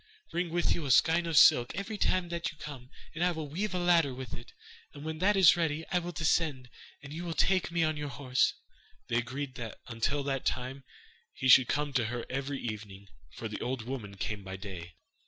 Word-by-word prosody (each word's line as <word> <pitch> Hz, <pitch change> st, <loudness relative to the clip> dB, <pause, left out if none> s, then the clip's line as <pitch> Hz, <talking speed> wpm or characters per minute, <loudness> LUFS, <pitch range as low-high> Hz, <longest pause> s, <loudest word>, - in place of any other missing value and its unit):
Bring 175 Hz, +1 st, -1 dB
with 175 Hz, +1 st, +1 dB
you 170 Hz, -, -3 dB
a -, -, -4 dB
skein 165 Hz, +6 st, +4 dB
of 165 Hz, -3 st, 0 dB
silk 120 Hz, 0 st, +6 dB
every 200 Hz, +3 st, -4 dB
time 185 Hz, -3 st, +1 dB
that 170 Hz, 0 st, -2 dB
you 155 Hz, -, -18 dB
come, 135 Hz, -5 st, -9 dB, 0.2 s
and 165 Hz, -, -2 dB
I 180 Hz, -, +4 dB
will 160 Hz, -3 st, -5 dB
weave 185 Hz, +7 st, -3 dB
a -, -, +1 dB
ladder 170 Hz, -6 st, +3 dB
with 130 Hz, -3 st, -7 dB
it, -, -, -9 dB, 0.4 s
and 145 Hz, +1 st, -9 dB
when 160 Hz, 0 st, -4 dB
that 200 Hz, +3 st, +3 dB
is 185 Hz, -5 st, +8 dB
ready 160 Hz, -2 st, -1 dB
I 180 Hz, -, +3 dB
will 175 Hz, 0 st, -5 dB
descend, 155 Hz, -6 st, 0 dB, 0.3 s
and 140 Hz, 0 st, -9 dB
you 170 Hz, +3 st, -5 dB
will 170 Hz, -2 st, -4 dB
take 185 Hz, -2 st, +2 dB
me 170 Hz, -1 st, +1 dB
on 155 Hz, -1 st, 0 dB
your 145 Hz, -1 st, -4 dB
horse.' 130 Hz, -2 st, +1 dB, 0.5 s
They 115 Hz, -, +1 dB
agreed 130 Hz, +3 st, -3 dB
that 115 Hz, -2 st, -6 dB
until 125 Hz, +5 st, -1 dB
that 135 Hz, -1 st, -2 dB
time 130 Hz, +1 st, -3 dB, 0.5 s
he 130 Hz, -, -2 dB
should 125 Hz, -1 st, +8 dB
come 145 Hz, -1 st, -1 dB
to 125 Hz, -4 st, +2 dB
her 120 Hz, +2 st, -4 dB
every 135 Hz, +1 st, -3 dB
evening, 100 Hz, -3 st, -7 dB, 0.3 s
for 115 Hz, -, -5 dB
the 105 Hz, -, -6 dB
old 125 Hz, -1 st, -2 dB
woman 110 Hz, -5 st, -6 dB
came 100 Hz, +1 st, -4 dB
by 95 Hz, 0 st, -6 dB
day. 90 Hz, -4 st, -8 dB
140 Hz, 220 wpm, -30 LUFS, 120-170 Hz, 0.5 s, is